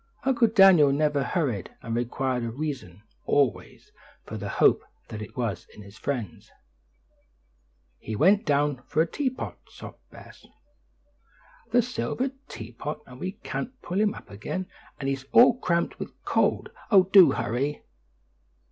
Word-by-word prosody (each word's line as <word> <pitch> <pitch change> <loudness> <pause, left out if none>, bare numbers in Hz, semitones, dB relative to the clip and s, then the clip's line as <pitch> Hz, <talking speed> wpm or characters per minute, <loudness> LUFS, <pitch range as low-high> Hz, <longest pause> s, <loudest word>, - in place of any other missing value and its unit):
Uncle 245 -3 +3
Daniel 195 -9 +6
never 145 0 +1
hurried, 135 - -2
and 115 - -4
required 125 +1 -1
a 115 - -2
reason, 115 - -6 0.2
always, 120 -11 0 0.3
for - - -7
the - - -5
hope - - +3 0.3
that 105 +5 -8
was 115 -7 -3
in 105 - -11
his 100 +1 -14
friends. 120 -6 -5 1.5
"He 110 - -6
went 195 - +4
down 145 -3 +1
for 160 +2 +2
the - - -16
teapot," 260 -3 -3
sobbed - - -11
Bess, - - -15 1.2
"the 245 0 +3
silver 250 +2 -2 0.2
teapot, 120 +7 -7
and 125 0 -13
we 185 +4 -4
can't 260 0 -5
pull 185 +4 -1
him 210 -1 +1
up - - -13
again; 105 - -4 0.3
and 135 - -3
he's 135 -1 -2
all 245 +1 +7
cramped 170 -5 -1
with - - -5 0.2
cold. - - +1 0.2
Oh, 195 -4 +7
do 190 -1 +7
hurry!" 125 +5 -2
145 Hz, 140 wpm, -26 LUFS, 120-190 Hz, 1.5 s, all